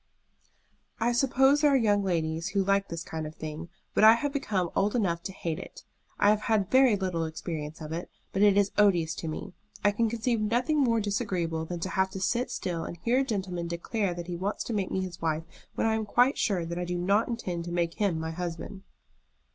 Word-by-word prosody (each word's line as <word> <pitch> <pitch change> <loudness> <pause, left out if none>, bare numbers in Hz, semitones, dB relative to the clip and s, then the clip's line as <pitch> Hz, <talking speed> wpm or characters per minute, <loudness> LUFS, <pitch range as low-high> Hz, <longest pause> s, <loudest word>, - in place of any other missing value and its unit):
"I 235 +2 +2
suppose 270 +3 +3
there 300 - +5
are 280 - +4
young 205 -4 +2
ladies 165 -3 -1
who 200 -1 +1
like 195 +1 +2
this 170 0 -5
kind 160 -2 -5
of 155 - -10
thing, 155 +2 -6 0.2
but - - +3
I 220 +1 +10
have 285 +4 -2
become 195 - -1
old 205 +3 +1
enough 175 -8 0
to 175 - -5
hate 165 -4 -4
it. - - -10 0.3
I 205 - +5
have 210 0 +1
had 215 -5 +1
very 260 -4 +6
little 185 -4 -1
experience 160 -1 -5
of 155 0 -6
it, 170 +2 -5 0.2
but 195 - 0
it 205 -1 +6
is 200 -1 +3
odious 175 -6 +4
to 165 - -6
me. 165 +4 -5 0.3
I 205 - +5
can 225 +2 +1
conceive 230 0 0
nothing 245 +8 +1
more 235 -5 +3
disagreeable 185 -6 -1
than 175 +1 -5
to 185 - -2
have 190 +2 +1
to 190 - -4
sit 235 +6 0
still 170 -3 -3
and 170 - -6
hear 235 +9 +1
a - - +3
gentleman 190 -8 -3
declare 175 +3 -2
that 175 -1 -6
he 175 0 -4
wants 195 +4 -2
to 235 - -4
make 200 -3 -1
me 190 - -1
his 185 -2 -6
wife, 160 -1 0 0.3
when - - 0
I 225 - +3
am 220 -1 -1
quite 245 +6 +4
sure 185 -6 0
that 170 +1 -4
I - - -1
do 175 0 -2
not 200 +5 +2
intend 180 -8 -3
to 175 - -5
make 170 -1 0
him 200 -7 0
my 160 0 -3
husband." 175 +3 -5
190 Hz, 230 wpm, -28 LUFS, 170-220 Hz, 0.3 s, I